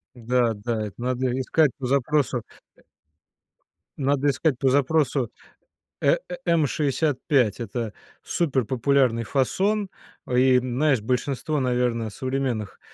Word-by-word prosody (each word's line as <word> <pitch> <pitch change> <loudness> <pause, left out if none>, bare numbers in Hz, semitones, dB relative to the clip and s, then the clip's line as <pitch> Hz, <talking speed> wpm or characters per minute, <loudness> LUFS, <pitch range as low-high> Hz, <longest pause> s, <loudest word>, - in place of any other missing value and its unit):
Да-да, 115 -2 0
это 100 - -10
надо 125 0 -1
искать 150 +1 +3
по 130 -3 -4
запросу, 140 -1 +1 0.4
э - - -23 1.2
Надо 140 0 +1
искать 140 0 +1
по 135 - +3
запросу 140 -3 +1 0.7
э - - +4
э 270 - -4
М65- 145 - +1
это 115 -1 -4 0.3
суперпопулярный 130 -4 +1
фасон, 195 - 0 0.4
а, - - -5
и 130 0 +5
знаешь, 130 +1 +1
большинство, 135 +6 -1
наверное, 125 -3 0
современных 130 -3 -3
130 Hz, 105 wpm, -24 LUFS, 120-145 Hz, 1.2 s, и